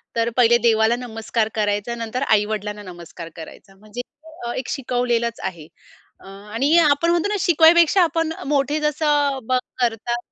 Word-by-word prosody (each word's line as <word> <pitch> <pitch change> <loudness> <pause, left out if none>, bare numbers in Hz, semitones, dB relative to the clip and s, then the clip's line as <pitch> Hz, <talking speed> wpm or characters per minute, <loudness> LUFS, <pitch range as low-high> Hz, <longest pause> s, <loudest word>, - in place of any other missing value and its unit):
तर 230 0 +1
पहिले 240 -1 +5
देवाला 225 0 +3
नमस्कार 225 -2 -3
करायचा 205 +2 -1
नंतर 230 +2 -4
आई-वडिलांना 210 -1 0
नमस्कार 175 -2 -10
करायचा. 195 +4 -12
म्हणजे 215 +4 -8 0.5
अ, - - -2
एक 255 - -4
शिकवलेलच 240 -3 -1
आहे. 170 -5 -6 0.5
अ, - - -18
आणि 215 - -1
आपण 300 +1 +3
म्हणतो 345 +2 +1
ना 415 - -1
शिकवण्यापेक्षा 340 +1 +5
आपण 330 -1 -1 0.2
मोठे 290 +1 0
जसं 295 -2 +1
बग 255 0 +2 0.2
करतात 240 0 -1
235 Hz, 145 wpm, -21 LUFS, 215-290 Hz, 0.5 s, पहिले